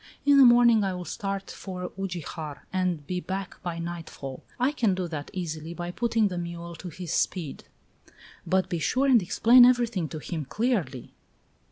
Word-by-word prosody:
In 285 -1 +6
the 270 - +9
morning 240 -2 +6
I 190 -2 -1
will 180 -1 -6
start 195 +1 -4
for 180 -2 -6
Ugijar 170 -5 -5
and 180 -5 -1
be 180 +4 -2
back 190 +1 -5
by 175 -3 -4
nightfall; 165 -6 -6 0.2
I 255 +3 +3
can 225 -10 +1
do 185 -1 -2
that 150 -3 -6
easily 165 -2 -5
by 175 0 -4
putting 225 +1 +1
the 180 -2 -4
mule 170 0 -6
to 180 - -7
his 175 0 -6
speed." 165 -7 -2 0.8
"But 190 -1 +1
be 175 -2 -2
sure 250 - +1
and 255 -5 +5
explain 235 +7 +6
everything 235 -9 +3
to 160 - -6
him 155 0 -5
clearly." 180 - -2
180 Hz, 175 wpm, -27 LUFS, 170-220 Hz, 0.8 s, the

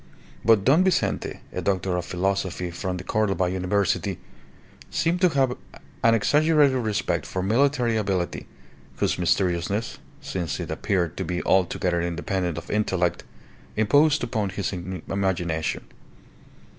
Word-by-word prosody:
But 110 -4 +5
Don 150 - +5
Vincente, 190 -1 0
a - - -3
doctor 95 -2 0
of 90 -1 -2
philosophy 90 -1 -1
from 90 +1 -3
the 90 - -7
Cordova 100 -2 +1
University, 95 +2 0 0.7
seemed 175 +2 0
to 180 - +6
have 135 -5 +1 0.5
an 115 0 +5
exaggerated 150 +2 +4
respect 110 -4 -1
for 95 - -3
military 120 +2 +2
ability, 95 -4 -2 0.5
whose - - 0
mysteriousness 90 +4 0 0.2
since 85 -5 -4
it - - -4
appeared 90 -4 -1
to - - -2
be 90 0 -3
altogether 90 -2 +1
independent 85 0 -2
of 85 - -7
intellect 90 -4 0 0.5
imposed 145 +8 +3
upon 110 -5 -1
his 100 +2 -3
imagination. 90 -2 -2
95 Hz, 125 wpm, -25 LUFS, 90-115 Hz, 0.7 s, to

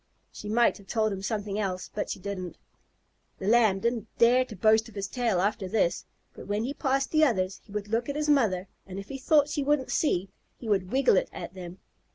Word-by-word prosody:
She 210 - -8
might 235 0 +3
have 195 - -17
told 215 -1 0
him 190 - -5
something 205 0 -3
else, 185 -3 -3
but 210 - -3
she - - -4
didn't. 185 -2 -6 0.8
The 190 - -5
Lamb 215 -4 +4
didn't 235 -2 -1
dare 245 +2 +5
to 225 - -10
boast 220 +4 +3
of 225 - -17
his 200 -1 -3
tail 230 -4 0
after 200 0 0
this, 190 -4 0 0.3
but - - -11
when 205 +2 -1
he 265 +4 -3
passed 275 -1 0
the 310 0 +4
others, 190 -9 +1
he 205 - -18
would 210 0 -4
look 230 +4 -1
at 285 - -2
his 300 0 -1
mother, 215 -11 +2 0.2
and 190 0 -7
if 195 0 -7
he 270 - -6
thought 290 +2 +4
she 295 0 -2
wouldn't 285 -1 +1
see, 190 - 0 0.3
he 235 - -9
would 190 -3 0
wiggle 265 -6 +4
it - - +1
at - - -7
them. 180 -1 -9
215 Hz, 225 wpm, -28 LUFS, 195-250 Hz, 0.8 s, dare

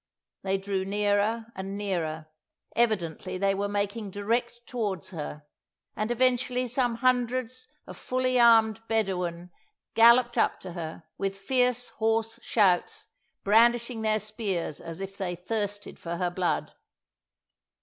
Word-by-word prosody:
They 195 0 0
drew 195 -1 -2
nearer 205 +3 +1
and 195 +1 -5
nearer; 165 -6 -2 0.5
evidently 185 -5 0
they 195 +1 +2
were 200 +1 -1
making 205 +1 -2
direct 235 +4 -1
towards 210 -8 -3
her; 150 -3 -6 0.5
and 215 +1 -2
eventually 250 +1 +1
some 245 -1 +1
hundreds 255 0 0 0.2
of - - -10
fully 255 0 0
armed 225 -2 +5
Bedawun 180 -5 -1 0.4
galloped 235 +1 +6
up - - +2
to 180 -2 -8
her, 165 -1 -6 0.2
with 195 0 -2
fierce, 245 +3 +1
hoarse 225 +1 -1
shouts, 225 - +1 0.3
brandishing 235 +2 +3
their 215 0 +2
spears 205 -7 -3
as 165 +1 -7
if 195 +1 -7
they 180 -2 -2
thirsted 205 +2 -4
for 170 0 -4
her 175 0 -1
blood. 180 0 -1
210 Hz, 130 wpm, -27 LUFS, 190-235 Hz, 0.5 s, galloped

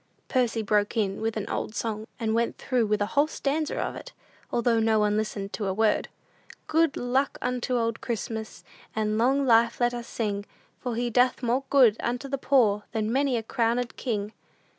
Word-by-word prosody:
Percy 240 -3 +1
broke 210 +1 +1
in 200 -2 0
with 225 0 -1
an 210 - -3
old 215 - -3
song, 220 -1 -3
and 220 -2 0
went 230 +1 0
through 245 -4 0
with 210 0 +1
a 205 - -5
whole 290 +2 +4
stanza 305 0 -2
of - - -2
it, - - -9 0.4
although 235 -1 +2
no 220 0 +3
one 210 -1 +2
listened 210 -2 -3
to 210 - -2
a 190 - -1
word: 220 0 +2 0.6
"Good 320 -2 +2
luck 260 +3 0
unto 250 0 -1
old 230 -1 -1
Christmas, 220 -1 -4 0.3
And 215 0 0
long 270 +4 +3
life 230 -1 +4
let 240 0 +2
us 240 -1 -5
sing, 205 -3 -3 0.3
For 245 -2 -3
he 240 +1 -1
doeth 250 +2 +2
more 250 +3 +1
good 245 -6 +5
unto 245 +3 -2
the 275 0 -3
poor 235 -7 +3
Than 220 0 -1
many 270 -2 +2
a 225 - -3
crownéd 235 +2 0
king." 215 -4 -3
230 Hz, 190 wpm, -27 LUFS, 215-250 Hz, 0.6 s, good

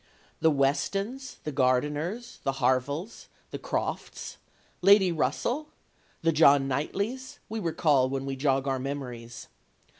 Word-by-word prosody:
The 160 - +4
Westons, 195 - -1
the 150 - -3
Gardiners, 150 - 0
the 135 - -1
Harvilles, 135 - -1 0.2
the - - -5
Crofts, - - -4 0.4
Lady 195 -1 +6
Russell, 245 - -1 0.6
the 165 - +4
John 145 -3 +5
Knightleys, 200 - -3
we 220 +1 -3
recall 150 -7 +2
when 135 0 -3
we 135 0 -3
jog 135 0 +1
our 135 -1 0
memories. 125 -4 -6
145 Hz, 120 wpm, -28 LUFS, 135-195 Hz, 0.6 s, Lady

